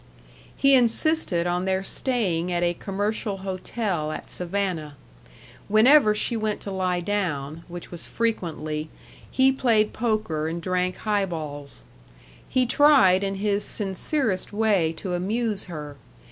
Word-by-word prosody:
He 275 0 +4
insisted 245 - +3
on 175 +1 -1
their 190 0 0
staying 190 -8 0
at 175 0 0
a 175 0 +1
commercial 205 +2 -3
hotel 185 -4 -3
at - - -7
Savannah. 175 -5 -3 0.7
Whenever 215 +2 +5
she 235 +3 0
went 215 -1 -2
to 200 - -6
lie 185 -2 -1
down, 165 -6 -3
which 175 0 -9
was 175 -2 -7
frequently, 160 -9 -3 0.4
he 265 0 +4
played 230 -5 +2
poker 215 -9 -1
and 165 +2 -3
drank 180 +1 -1
highballs. 160 -9 -3 0.7
He 255 -1 +2
tried 245 -9 +5
in 195 0 -2
his 205 +1 0
sincerest 205 - 0
way 205 -6 +2
to 180 +2 -5
amuse 210 +3 -1
her. 150 -5 -8
195 Hz, 130 wpm, -24 LUFS, 175-220 Hz, 0.7 s, Whenever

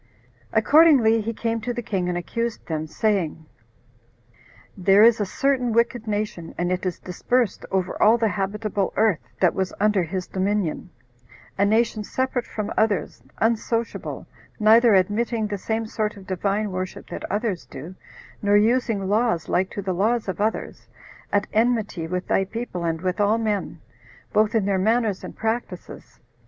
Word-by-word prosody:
Accordingly 235 -2 +5
he 225 +2 -3
came 230 0 -2
to 245 +3 -3
the 240 - -4
king, 185 -5 -2
and 175 - -1
accused 230 +6 -3
them, 155 -1 -3
saying, 170 -4 -1 1.3
"There 195 +2 +5
is 230 0 +6
a 205 - -1
certain 255 +1 0
wicked 235 0 +1
nation, 205 -5 -3
and 175 +1 -1
it 185 +1 -1
is 180 - -3
dispersed 235 +5 -1
over 190 -1 -2
all 220 +3 +6
the 230 -1 +1
habitable 200 +1 -2
earth 215 -6 +3 0.2
that - - +4
was 190 -1 -2
under 210 -1 +3
his 180 +2 -3
dominion; 190 -2 -2 0.7
a 200 - +2
nation 220 0 +1
separate 260 +2 -2
from 215 -2 -4
others, 210 - 0 0.2
unsociable, 230 +1 -1 0.3
neither 220 +1 +6
admitting 215 +4 +1
the 205 -1 -4
same 225 +3 -2
sort 215 -1 -3
of 195 - -12
Divine 200 +3 -1
worship 185 0 -5
that - - -6
others 205 -3 -2
do, 150 +7 -9 0.5
nor 205 0 +4
using 220 -2 +1
laws 210 -4 +1
like 185 +1 +1
to 200 - -6
the 190 -1 -1
laws 215 +5 +1
of 190 +1 -3
others, 220 +1 -2 0.4
at 205 0 +2
enmity 220 -7 +1
with 180 +2 -3
thy 195 - +2
people, 195 -3 -5
and 165 -1 -1
with 185 +2 -2
all 205 +2 +3
men, 210 -7 -2 0.5
both 215 +2 +2
in 215 -3 +2
their 195 -1 +1
manners 220 0 +1
and - - -8
practices. 225 +2 -5
210 Hz, 160 wpm, -23 LUFS, 190-225 Hz, 1.3 s, is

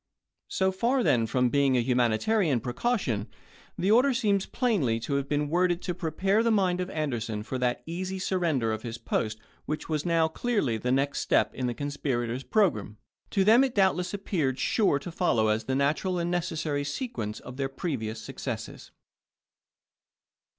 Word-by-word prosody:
So 190 0 +1
far 240 +7 +1
then 115 - +3
from 125 +2 +2
being 140 -1 +3
a - - +3
humanitarian 125 - +2
precaution, 125 - -1 0.5
the 190 +3 +1
order 250 +4 +5
seems 205 -6 +1
plainly 170 - +1
to 130 - -3
have 140 0 -1
been 150 0 0
worded 175 +2 +2
to 180 - -2
prepare 185 +5 +1
the 230 - +2
mind 185 -4 +2
of 180 - -3
Ander 150 -6 -2
son 110 -2 -4
for 130 +3 -4
that 125 -1 0
easy 185 +3 -4
surrender 170 -11 0
of 110 0 -3
his 115 0 -5
post 110 -1 -2 0.3
which 155 +1 -4
was 155 -2 0
now 165 -2 +2
clearly 160 - -1
the 125 +3 -2
next 135 +2 +1
step - - +2
in 130 - -2
the 120 - -2
conspirators' 130 -4 -2
pro 205 +5 +3
gramme. 105 0 -8 0.3
To 195 - +2
them 225 +6 +6
it 260 -2 -1
doubtless 185 -3 +2
appeared 165 -10 -1
sure 195 - +2
to 170 +5 -7
follow 115 -11 +2
as 110 +1 0
the 130 - -1
natural 150 +7 +1
and 170 0 -1
necessary 160 -4 -1
sequence 145 - -4
of 125 +1 -10
their 135 -1 -1
previous 125 -7 -4
successes. 110 - -6
150 Hz, 175 wpm, -28 LUFS, 125-190 Hz, 0.5 s, them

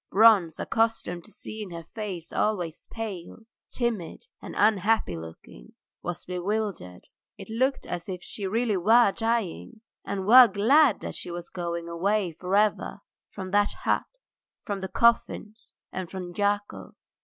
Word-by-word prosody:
Bronze, 200 -6 +5
accustomed 225 -6 -1
to 215 - -16
seeing 215 -2 -8
her 170 -1 -7
face 195 -7 -6
always 180 -7 -1
pale, 210 -5 -6 0.3
timid, 230 -9 -3 0.2
and - - -8
unhappy 210 - +2
looking, 80 -7 -11 0.3
was 175 0 -5
bewildered. 180 - -3 0.3
It - - -10
looked 260 +4 0
as 175 +2 -5
if 180 -1 -5
she 200 -3 -5
really 220 0 +1
were 220 +4 +5
dying 230 0 -2 0.2
and 195 -1 -3
were 245 +4 +9
glad 230 +5 +4
that - - -5
she - - -6
was 175 0 -6
going 170 -1 -4
away 185 +3 0
for 180 +4 -3
ever 210 +1 +1 0.3
from 190 -2 -7
that 205 0 +3
hut, - - +1 0.6
from 200 -2 -4
the 190 - -3
coffins, 230 -1 +1
and 185 -2 -5
from 180 -2 -6
Yakov.. 205 0 -2
200 Hz, 145 wpm, -27 LUFS, 175-220 Hz, 0.6 s, were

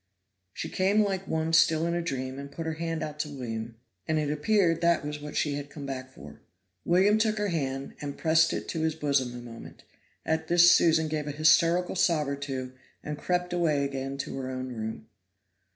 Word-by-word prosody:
She - - -5
came 200 +3 +2
like 195 -2 -2
one 160 0 -1
still 165 0 +4
in 170 - 0
a 175 - 0
dream, 130 -4 -4
and 140 0 -8
put 165 - -6
her 160 - -2
hand 165 0 -3
out 150 0 -6
to 150 - -2
William, 115 -4 -5 0.3
and 160 - +1
it 150 -1 0
appeared 165 +1 +2
that 170 -3 +2
was 150 0 -5
what 150 0 -8
she 150 - +1
had 145 0 -5
come 145 -1 -8
back 130 -1 -5
for. 75 - -13 0.4
William 195 +5 +4
took 220 -1 +1
her 210 -1 0
hand 135 -5 -3
and 145 -1 -5
pressed 160 0 +3
it - - -4
to 160 - -2
his 160 -1 0
bosom 140 -5 0
a - - -6
moment. 115 -1 -11 0.4
At 160 0 -1
this 175 +1 +7
Susan 160 -1 +4
gave 155 -1 -3
a - - -2
hysterical 165 +4 +3
sob 165 -5 +2
or 140 - -1
two, 135 -2 -5 0.3
and 150 - -4
crept 180 +3 -1
away 155 -5 +1
again 135 0 -4
to 140 - -5
her 130 -1 -4
own 130 0 -4
room. 110 -1 -5
155 Hz, 210 wpm, -28 LUFS, 140-170 Hz, 0.4 s, this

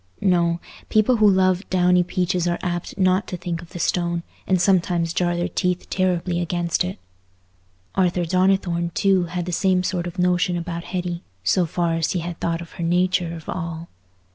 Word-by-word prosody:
No: 170 -3 +2 0.3
people 215 +3 +3
who 215 -1 +6
love 185 0 +2
downy 180 -1 +4
peaches 180 0 0
are 175 0 0
apt 175 0 -3
not 185 +1 +2
to 180 - -4
think 170 -1 -4
of 170 - -13
the - - -8
stone, 170 0 0 0.2
and 185 -1 +3
sometimes 175 -3 +2
jar 175 -1 +1
their 175 - 0
teeth 180 -1 -2
terribly 180 -1 0
against 175 0 0
it. 185 +2 -4 1.0
Arthur 180 -2 +1
Donnithorne, 180 -1 +1
too, 190 -3 +3
had 175 0 -4
the 180 - -4
same 185 +1 +2
sort 180 -2 -1
of 175 - -8
notion 180 0 +2
about 170 0 -5
Hetty, 175 -2 -3 0.2
so 175 - +2
far 170 +1 0
as 165 -1 0
he 180 - -1
had 170 0 -6
thought 170 0 -1
of 170 - -10
her 170 - -6
nature 175 0 +1
of 160 - -11
all. 170 -2 -5
175 Hz, 185 wpm, -22 LUFS, 170-185 Hz, 1.0 s, who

